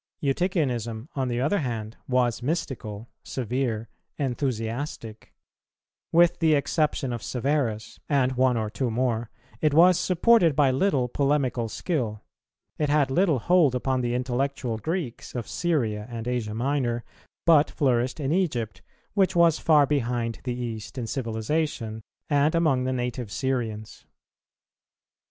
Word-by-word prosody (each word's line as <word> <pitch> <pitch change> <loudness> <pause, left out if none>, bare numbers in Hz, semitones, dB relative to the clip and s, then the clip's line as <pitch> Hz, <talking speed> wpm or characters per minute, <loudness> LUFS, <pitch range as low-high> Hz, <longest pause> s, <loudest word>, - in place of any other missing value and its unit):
Eutychianism, 135 - -1
on 135 -2 0
the 120 -1 -1
other 150 +11 +1
hand, 115 -6 -4
was 125 -2 +1
mystical, 120 -7 -3
severe, 120 -2 -2 0.3
enthusiastic; 120 -3 -3 0.8
with 170 +1 +4
the 160 -2 +4
exception 145 -3 0
of 120 - -4
Severus, 125 -5 -2
and 135 -3 +2
one 130 -1 +2
or 110 -1 -2
two 120 +4 -1
more, 115 -1 -1 0.3
it 150 -2 +2
was 175 +2 +6
supported 180 - +4
by 140 -2 +4
little 135 -3 +1
polemical 130 -3 0
skill; 115 - -2 0.6
it 150 -2 +1
had 145 -2 +2
little 165 0 +3
hold 155 0 +3
upon 130 0 0
the 120 0 -1
intellectual 125 -2 -2
Greeks 155 - -4
of 120 -2 -3
Syria 115 -12 -1
and 115 -1 -6
Asia 120 -4 -2
Minor, 120 -1 0 0.4
but 155 -3 +5
flourished 125 -1 0
in 140 -1 -1
Egypt, 145 - -1 0.3
which 190 -2 +2
was 170 -2 +4
far 150 -3 +5
behind 120 -5 -1
the 125 -1 -2
East 115 0 -5
in 120 - -2
civilization, 115 0 -2 0.3
and 145 +1 +2
among 145 -7 +2
the 130 - 0
native 125 -3 -3
Syrians. 115 -5 -3
130 Hz, 135 wpm, -26 LUFS, 115-150 Hz, 0.8 s, was